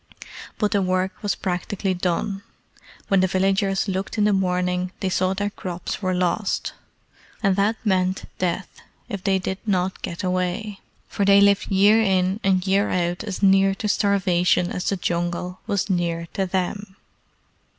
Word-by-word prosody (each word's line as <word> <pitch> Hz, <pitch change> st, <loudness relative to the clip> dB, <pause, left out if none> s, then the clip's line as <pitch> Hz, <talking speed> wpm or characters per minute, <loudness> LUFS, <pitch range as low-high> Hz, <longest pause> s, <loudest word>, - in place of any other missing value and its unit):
But 210 Hz, -2 st, 0 dB
the 200 Hz, -, +2 dB
work 185 Hz, +1 st, -1 dB
was 205 Hz, -4 st, -1 dB
practically 190 Hz, +1 st, -2 dB
done. 185 Hz, +2 st, -2 dB, 0.7 s
When 195 Hz, -, +3 dB
the 185 Hz, -, +3 dB
villagers 195 Hz, +2 st, +1 dB
looked 190 Hz, +2 st, -3 dB
in 210 Hz, -, +3 dB
the 210 Hz, 0 st, +3 dB
morning 180 Hz, -1 st, 0 dB
they 190 Hz, -, -1 dB
saw 185 Hz, +1 st, +1 dB
their 205 Hz, +1 st, -2 dB
crops 180 Hz, 0 st, -5 dB
were 185 Hz, -2 st, 0 dB
lost. 185 Hz, +3 st, -1 dB, 0.7 s
And 195 Hz, -2 st, +3 dB
that 205 Hz, +3 st, +2 dB
meant 185 Hz, -2 st, +1 dB
death 180 Hz, +1 st, -3 dB, 0.3 s
if 200 Hz, -2 st, -5 dB
they 195 Hz, -1 st, +2 dB
did 190 Hz, +1 st, -3 dB
not 190 Hz, -3 st, -1 dB
get 170 Hz, +3 st, -5 dB
away, 185 Hz, +3 st, -2 dB, 0.3 s
for 200 Hz, -, -2 dB
they 200 Hz, 0 st, +6 dB
lived 200 Hz, 0 st, +4 dB
year 205 Hz, +3 st, +5 dB
in 190 Hz, -1 st, +1 dB
and 190 Hz, -1 st, +2 dB
year 195 Hz, +2 st, +2 dB
out 175 Hz, +1 st, -1 dB
as 200 Hz, -2 st, -5 dB
near 195 Hz, 0 st, +5 dB
to 210 Hz, -, -3 dB
starvation 185 Hz, -4 st, +2 dB
as 180 Hz, -, -2 dB
the 195 Hz, -, -1 dB
Jungle 175 Hz, +1 st, -2 dB
was 200 Hz, 0 st, 0 dB
near 170 Hz, -3 st, -1 dB
to 195 Hz, -1 st, -1 dB
them. 190 Hz, +2 st, -3 dB
190 Hz, 160 wpm, -23 LUFS, 180-200 Hz, 0.7 s, they